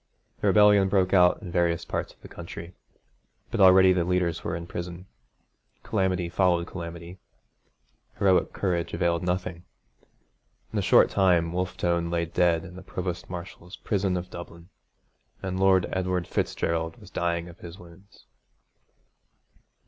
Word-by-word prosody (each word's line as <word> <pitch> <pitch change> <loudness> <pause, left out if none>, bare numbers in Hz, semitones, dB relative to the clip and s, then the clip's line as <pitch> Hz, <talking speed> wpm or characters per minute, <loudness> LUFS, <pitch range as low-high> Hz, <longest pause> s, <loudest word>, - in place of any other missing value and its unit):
The - - 0
rebellion 105 -2 +5
broke 95 -1 +2
out 90 +1 +4
in 90 - -7
various 85 -1 0
parts - - -3
of - - -25
the - - -9
country, 85 +1 -9 0.8
but - - -2
already 95 0 +7
the 90 -2 +1
leaders 85 -1 -1
were 85 - -3
in 85 0 -6
prison. 85 +1 -7 0.8
Calamity 95 -4 0
followed 85 -1 +1
calamity. 85 0 -8 1.0
Heroic 95 -2 +3
courage 85 -3 -2
availed 85 -1 0
nothing. 90 -1 -3 1.1
In - - 0
a - - +1
short - - +5
time 90 -4 +2
Wolfe 90 0 -3
Tone 85 -1 0
lay 85 0 0
dead 85 0 +1
in 90 -1 -11
the - - -9
Provost 90 -2 -5
Marshal's 90 0 -9
prison 95 -3 -1
of 90 +1 -6
Dublin; 85 0 -10 0.7
and 95 -1 -3
Lord 95 -2 +4
Edward 90 -1 -1
Fitzgerald 80 0 -2
was 100 -3 -15
dying 85 0 -1
of 85 -1 -13
his 85 +1 -10
wounds. 90 +2 -17
90 Hz, 145 wpm, -26 LUFS, 85-95 Hz, 1.1 s, already